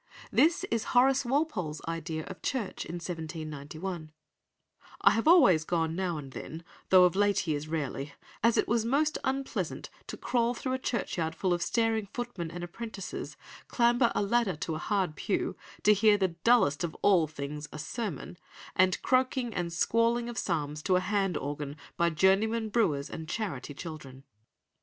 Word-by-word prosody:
This 330 +3 +4
is 230 -1 +1
Horace 265 +1 +5
Walpole's 240 - -1
idea 165 -1 -3
of - - -9
church 250 -8 -3
in 170 - -6
1791: 160 0 -6 0.9
"I - - +7
have 225 +6 0
always 255 - +7
gone 165 -1 0
now 180 -3 -1
and 140 -3 -8
then, 160 +5 -8 0.3
though 185 -1 +8
of 180 0 +4
late 205 -2 +2
years 155 -2 -2
rarely, 145 -2 -3 0.3
as 230 +1 +3
it - - +2
was 230 0 +2
most 285 +6 +1
unpleasant 270 0 -3 0.2
to - - -6
crawl 240 0 0
through 255 +2 -3
a 260 - -1
churchyard 170 -10 -2
full 185 +1 +1
of 175 - -1
staring 225 -1 +1
footmen 235 -9 -4
and 175 +1 -7
apprentices, 195 +2 -6 0.3
clamber 240 0 +3
a - - +2
ladder 205 -3 +1
to 160 +2 -4
a 155 - -3
hard 190 -4 0
pew, 195 - -1 0.3
to 210 - +7
hear 210 0 +5
the 190 -2 +1
dullest 170 - +3
of 165 -2 -3
all 180 -6 +5
things, 150 0 -6
a - - -7
sermon, 180 - -5 0.4
and 185 0 +3
croaking 255 -2 +1
and 175 -1 -2
squalling 230 +7 +2
of 240 - -6
psalms 150 -4 -2
to 185 +3 +2
a - - +4
hand 195 -2 0
organ 145 +1 -5 0.2
by 170 0 +2
journey 190 +6 +3
men 220 -1 -2
brewers 160 -11 +1
and 160 -1 -7
charity 155 - -4
children." 140 -5 -8
185 Hz, 170 wpm, -29 LUFS, 160-230 Hz, 0.9 s, though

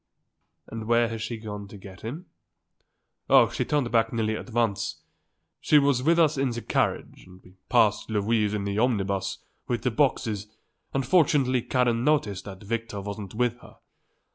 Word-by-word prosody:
"And 115 -1 -6
where 115 0 +3
has 115 -1 -5
she 115 +1 -4
gone 105 -2 -7
to 100 - -11
get 95 -1 -12
him?" 145 - -6 1.0
"Oh, - - +6
she - - -1
turned 145 -5 0
back 115 -1 +2
nearly 110 -2 -1
at - - -7
once. 115 -4 -1 0.6
She 150 - +4
was 140 -3 +3
with 165 +5 +3
us 155 -4 +3
in 135 -1 +1
the 120 -1 -5
carriage - - -1
and 90 0 -15
we 90 - -18 0.2
passed - - +3
Louise 105 0 +1
in 100 - -2
the 100 +1 -2
omnibus 100 -5 0 0.3
with 120 -2 -2
the 125 - +1
boxes 110 -6 0 0.4
and 135 -1 -1
fortunately 135 -6 +3
Karen 120 -1 +1
noticed 130 -10 +1
that 95 0 -9
Victor 115 -1 -4
wasn't 100 0 -7
with 120 +1 0
her. - - -16
115 Hz, 170 wpm, -26 LUFS, 105-125 Hz, 1.0 s, Oh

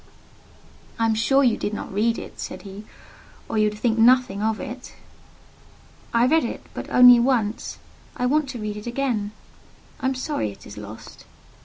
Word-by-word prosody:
"I 230 - +1
am 225 - +2
sure 270 +5 +3
you 240 -4 +3
did 210 - -3
not - - -7
read 225 +3 +1
it," - - -9
said - - -6
he; 200 +1 -10 0.6
"or 220 - -1
you 215 0 +3
would 210 - -9
think 225 +1 0
nothing 240 -4 +4
of 220 0 0
it!" 250 +2 -8 1.2
"I 235 0 +3
read 320 +5 +3
it, - - -5
but - - -7
only 250 -1 +8
once. 235 -3 0 0.4
I 250 - 0
want 285 +2 +1
to 250 -3 -6
read 210 -1 -4
it 210 - -8
again. 240 -5 -1 0.7
I - - -1
am 265 - 0
sorry 255 - -2
it 100 - -15
is 100 - -10
lost." 105 +1 -11
230 Hz, 180 wpm, -23 LUFS, 210-255 Hz, 1.2 s, only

